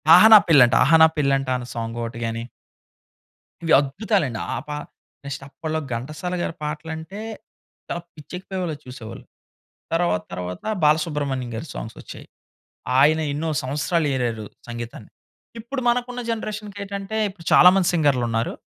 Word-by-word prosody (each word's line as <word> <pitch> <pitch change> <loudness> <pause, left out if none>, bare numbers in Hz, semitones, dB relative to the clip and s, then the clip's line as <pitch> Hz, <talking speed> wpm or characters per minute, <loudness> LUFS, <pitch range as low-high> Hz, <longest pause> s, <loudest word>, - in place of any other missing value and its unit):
అహ - - +8
నా 210 - +12
పెళ్ళంట, 125 -6 +7
అహ 145 - +2
నా - - +9
పెళ్ళంట 135 -2 +1
అన్న 120 - -7
సాంగ్ 115 0 -4
ఒకటి 115 0 -6
గాని 115 0 -3 1.2
ఇవి 165 - +2
అద్భుతాలండి. 145 - -1 0.2
ఆ - - -2
పాట 150 0 -4 0.4
నెక్స్ట్ 140 0 -6
అప్పట్లో 160 +1 -4 0.2
ఘంటసాలగారి 165 +7 -4
పాటలంటే 160 +6 -6 0.7
చాలా 175 - -3 0.2
పిచ్చెక్కిపోయేవాళ్ళలా 180 +1 -5
చూసేవాళ్ళు. 125 -3 -9 0.7
తర్వాత 165 - +1
తర్వాత 90 0 -6 0.2
బాలసుబ్రహ్మణ్యం 150 -5 +1
గారి 115 +9 -5
సాంగ్స్ 110 - -7
వచ్చాయి. - - -11 0.7
ఆయన 155 +3 +5
ఎన్నో 160 +3 -2
సంవత్సరాలేరారు 130 -5 -1 0.2
సంగీతాన్ని. 120 -2 -7 0.5
ఇప్పుడు 255 +4 -4
మనకున్న 245 +1 0
జనరేషన్‌కేటంటే 205 -2 -5
ఇప్పుడు 190 -4 -13
చాలామంది 180 0 +7
సింగర్‌లున్నారు. 125 -7 +1
150 Hz, 120 wpm, -23 LUFS, 125-180 Hz, 1.2 s, నా